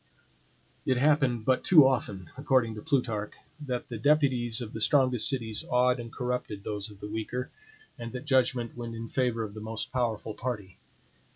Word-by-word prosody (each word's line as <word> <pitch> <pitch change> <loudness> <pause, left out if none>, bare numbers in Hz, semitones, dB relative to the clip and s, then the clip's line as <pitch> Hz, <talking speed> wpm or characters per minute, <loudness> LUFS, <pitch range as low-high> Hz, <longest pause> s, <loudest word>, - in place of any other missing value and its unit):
It 130 - +1
happened 135 -5 +2
but 130 -1 +2
too 155 -7 +8
often, 100 -9 -2
according 130 -4 +1
to 105 - -8
Plutarch, 120 -8 -1 0.3
that 125 -4 -3
the 115 -3 -6
deputies 130 -4 +2
of 115 -3 -6
the 110 - -5
strongest 130 -3 +4
cities 115 -6 -1
awed 125 0 +3
and 115 -1 -7
corrupted 125 -5 -3
those 105 0 -3
of 105 -2 -15
the 105 - -5
weaker; 110 +4 -4 0.5
and 115 0 -6
that 125 +3 -6
judgment 130 -4 +1
went 120 -1 -6
in 115 0 -6
favor 125 -3 0
of 105 -2 -6
the 110 - -8
most 110 0 -4
powerful 115 -3 -1
party. 105 -6 -5
120 Hz, 175 wpm, -28 LUFS, 110-130 Hz, 0.5 s, too